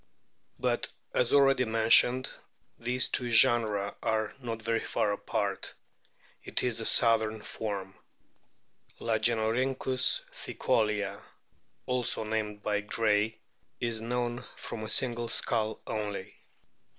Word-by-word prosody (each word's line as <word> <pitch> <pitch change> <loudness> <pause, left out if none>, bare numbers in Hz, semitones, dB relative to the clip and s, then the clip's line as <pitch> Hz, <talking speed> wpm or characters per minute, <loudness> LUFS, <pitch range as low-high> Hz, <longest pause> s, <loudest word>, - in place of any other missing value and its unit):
But, - - 0 0.2
as 125 -1 +2
already 135 -2 +5
mentioned, 115 +3 +4 0.5
these 125 +1 +1
two 125 -2 0
genera 115 -4 +3
are 110 -1 -1
not 115 -2 -4
very 115 +1 0
far 105 - -1
apart; 100 - -3 0.7
it - - -2
is 120 -2 0
a 110 - +1
southern 110 -2 +5
form. 100 -3 -5 1.1
Lagenorkynckus 120 +3 +1
tkicolea, 105 -3 -1 0.6
also 125 -3 0
named 105 -1 -3
by 105 -1 0
Gray,f 105 0 +1 0.4
is 115 -2 -1
known 120 +1 -2
from 110 -2 -7
a 110 - -5
single 120 -1 +1
skull 110 -1 0
only. 105 -3 -4
115 Hz, 105 wpm, -29 LUFS, 105-120 Hz, 1.1 s, already